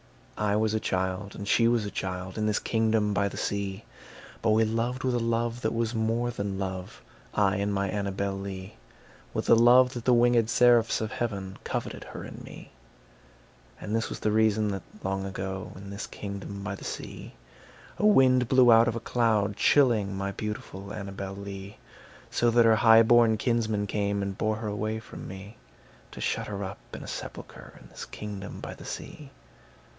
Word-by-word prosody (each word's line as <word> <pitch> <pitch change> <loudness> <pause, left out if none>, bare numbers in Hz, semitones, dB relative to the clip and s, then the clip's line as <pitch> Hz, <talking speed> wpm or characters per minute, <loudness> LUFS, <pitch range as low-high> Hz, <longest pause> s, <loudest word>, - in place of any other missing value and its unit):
I 105 -1 0
was 110 0 +1
a 110 - +1
child 95 +1 -2
and 100 - -6
she 115 +2 +4
was 115 -2 +2
a 100 - -5
child, 95 0 -4
In 110 -1 0
this 105 - +1
kingdom 110 -2 +1
by 100 0 +1
the - - -9
sea, 100 +1 -3 0.6
But 115 - +1
we 110 +1 +4
loved 115 +3 -1
with 130 -1 +1
a 120 - +1
love 115 +1 -1
that 110 0 -1
was 115 0 0
more 115 +2 0
than 100 -4 -3
love, 95 -1 -5 0.3
I 100 -1 +3
and 100 +1 0
my 100 0 0
Annabel 100 0 -2
Lee; 95 0 -7 0.6
With - - -2
a - - +7
love 125 +2 +6
that 120 -3 -6
the 125 - +5
wing├©d 120 -1 +4
seraphs 120 -1 +4
of 110 +1 -3
heaven 100 -6 -4
Coveted - - -4
her - - -8
and - - -9
me. - - -11 1.1
And 105 - -3
this 115 - -1
was - - -6
the 110 - +1
reason 110 -1 +3
that, 95 -2 -3 0.2
long 95 0 -1
ago, 95 0 -5
In 100 +1 -9
this 100 +2 -5
kingdom 100 0 -7
by 105 0 -3
the 100 - -9
sea, - - -7 0.6
A - - +2
wind 130 - +5
blew 130 -1 +6
out 115 +1 +7
of 115 - 0
a - - -2
cloud, 110 -4 +1
chilling 110 -7 +3
My 100 0 -2
beautiful 100 -1 -6
Annabel 100 -1 -6
Lee; 100 0 -8 0.5
So 120 - +2
that 115 0 +5
her 110 -1 +5
highborn 115 0 +6
kinsmen 110 -3 0
came 100 0 -1
And 100 0 -3
bore 110 +1 0
her 110 0 -5
away 110 +1 -2
from 110 - -10
me, 95 +4 -9 0.5
To - - -11
shut - - -1
her 100 -1 -4
up 95 +1 -6 0.2
in - - -8
a - - -9
sepulchre - - -8
In - - -16
this - - -8
kingdom 100 -2 -7
by - - -6
the - - -12
sea. 150 -3 -7
105 Hz, 190 wpm, -28 LUFS, 100-115 Hz, 1.1 s, a